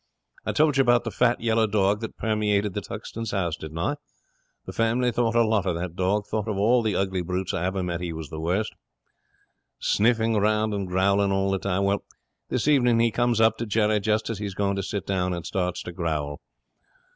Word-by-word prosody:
'I -, -, 0 dB
told 150 Hz, -2 st, +3 dB
you -, -, +6 dB
about 120 Hz, -2 st, +4 dB
the 115 Hz, -, -4 dB
fat 120 Hz, +1 st, +2 dB
yellow 115 Hz, -1 st, +2 dB
dog 100 Hz, -1 st, +2 dB
that 110 Hz, -, -6 dB
permeated 105 Hz, -2 st, 0 dB
the 105 Hz, -, -3 dB
Tuxton's 115 Hz, +5 st, -6 dB
house, 90 Hz, -5 st, -1 dB
didn't 80 Hz, -1 st, -8 dB
I? 105 Hz, -, -1 dB, 0.7 s
The -, -, -7 dB
family 120 Hz, +2 st, +1 dB
thought 115 Hz, 0 st, 0 dB
a 120 Hz, -, +5 dB
lot 110 Hz, -3 st, +1 dB
of 90 Hz, -, +1 dB
that 85 Hz, 0 st, -4 dB
dog, 95 Hz, +3 st, 0 dB
though 110 Hz, -, +1 dB
of 105 Hz, -, -5 dB
all 120 Hz, +5 st, +4 dB
the 110 Hz, -2 st, 0 dB
ugly 95 Hz, -1 st, 0 dB
brutes 90 Hz, +1 st, -3 dB
I 85 Hz, -, -1 dB
ever 95 Hz, 0 st, -1 dB
met 85 Hz, -1 st, -3 dB
he 90 Hz, -1 st, -3 dB
was 80 Hz, -3 st, -7 dB
the 80 Hz, -, -5 dB
worst. 90 Hz, +7 st, -1 dB, 1.0 s
Sniffing 115 Hz, 0 st, +2 dB
round 105 Hz, +1 st, +2 dB
and 100 Hz, -2 st, -2 dB
growling 100 Hz, +2 st, +2 dB
all 95 Hz, 0 st, +1 dB
the 95 Hz, -, 0 dB
time. 100 Hz, 0 st, -1 dB
Well, 100 Hz, 0 st, +1 dB, 0.5 s
this 125 Hz, +2 st, -1 dB
evening 125 Hz, -6 st, +4 dB
he 115 Hz, 0 st, +3 dB
comes 120 Hz, 0 st, +1 dB
up 110 Hz, 0 st, +3 dB
to 115 Hz, -, -3 dB
Jerry 105 Hz, 0 st, +2 dB
just 110 Hz, +2 st, 0 dB
as 110 Hz, -, -5 dB
he's 100 Hz, -2 st, -4 dB
going 100 Hz, -1 st, 0 dB
to -, -, 0 dB
sit 100 Hz, 0 st, -4 dB
down, 90 Hz, -2 st, 0 dB
and 85 Hz, -1 st, -6 dB
starts 90 Hz, 0 st, -2 dB
to 90 Hz, -, -6 dB
growl. 80 Hz, -5 st, -3 dB
100 Hz, 215 wpm, -25 LUFS, 95-115 Hz, 1.0 s, you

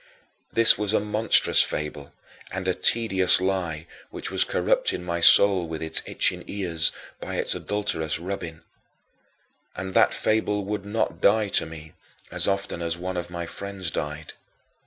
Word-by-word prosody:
This 115 Hz, -3 st, +5 dB
was 105 Hz, 0 st, -1 dB
a -, -, +3 dB
monstrous 105 Hz, +2 st, +3 dB
fable 75 Hz, -1 st, -4 dB, 0.4 s
and 95 Hz, 0 st, -5 dB
a 95 Hz, -, +2 dB
tedious 95 Hz, -6 st, +2 dB
lie 90 Hz, -4 st, -2 dB, 0.2 s
which -, -, -7 dB
was -, -, +2 dB
corrupting 90 Hz, -, 0 dB
my 85 Hz, -1 st, -3 dB
soul 95 Hz, +1 st, +6 dB
with 80 Hz, 0 st, -6 dB
its 80 Hz, -, +6 dB
"itching -, -, 0 dB
ears" 85 Hz, -5 st, -1 dB, 0.3 s
by -, -, -6 dB
its -, -, +2 dB
adulterous 90 Hz, -7 st, -3 dB
rubbing. 85 Hz, -2 st, -6 dB, 1.1 s
And 95 Hz, +1 st, -6 dB
that -, -, +4 dB
fable 105 Hz, -2 st, 0 dB
would 100 Hz, 0 st, -5 dB
not 110 Hz, +2 st, -2 dB
die 105 Hz, 0 st, +3 dB
to -, -, 0 dB
me 80 Hz, -1 st, -11 dB, 0.4 s
as -, -, +1 dB
often 100 Hz, -3 st, -2 dB
as 85 Hz, 0 st, -3 dB
one 90 Hz, +1 st, -5 dB
of 85 Hz, -1 st, -4 dB
my 85 Hz, -1 st, -5 dB
friends 95 Hz, -1 st, -6 dB
died. 75 Hz, +1 st, -5 dB
95 Hz, 155 wpm, -24 LUFS, 80-100 Hz, 1.1 s, soul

